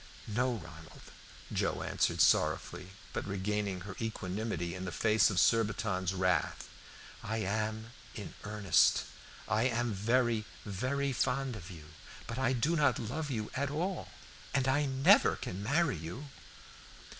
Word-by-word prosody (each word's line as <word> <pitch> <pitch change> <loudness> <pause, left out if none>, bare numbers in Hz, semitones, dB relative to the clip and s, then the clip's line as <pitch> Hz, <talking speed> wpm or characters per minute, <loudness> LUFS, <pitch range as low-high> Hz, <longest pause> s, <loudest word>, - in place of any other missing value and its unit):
"No, 120 +3 0
Ronald," 80 -6 -11 0.4
Joe - - 0
answered - - +1
sorrowfully, 90 +1 +2 0.3
but - - -3
regaining 100 -1 -2
her 95 +1 -7
equanimity 95 -5 -3
in 90 - -5
the 90 - -4
face 110 +1 +4
of 95 - +1
Surbiton's 105 -4 +2
wrath, 90 -1 0 0.5
"I 110 +2 -3
am 110 +2 -2 0.2
in 105 - -7
earnest. 105 -4 +3 0.4
I 110 +3 +2
am 120 -2 0
very, 115 +2 +1 0.2
very 130 +7 -1
fond 130 +1 0
of 95 -3 -9
you, 80 -5 -10 0.4
but 115 +2 -5
I 130 -1 +2
do 130 +7 +1
not 150 -3 +3
love 145 +7 -3
you 110 -5 -3
at 140 +1 -1
all, 175 +6 -2 0.5
and 135 -1 +2
I 145 +2 +2
never 135 0 +5
can 90 +2 -5
marry 145 - +1
you." 85 - -7
110 Hz, 140 wpm, -32 LUFS, 95-130 Hz, 0.5 s, never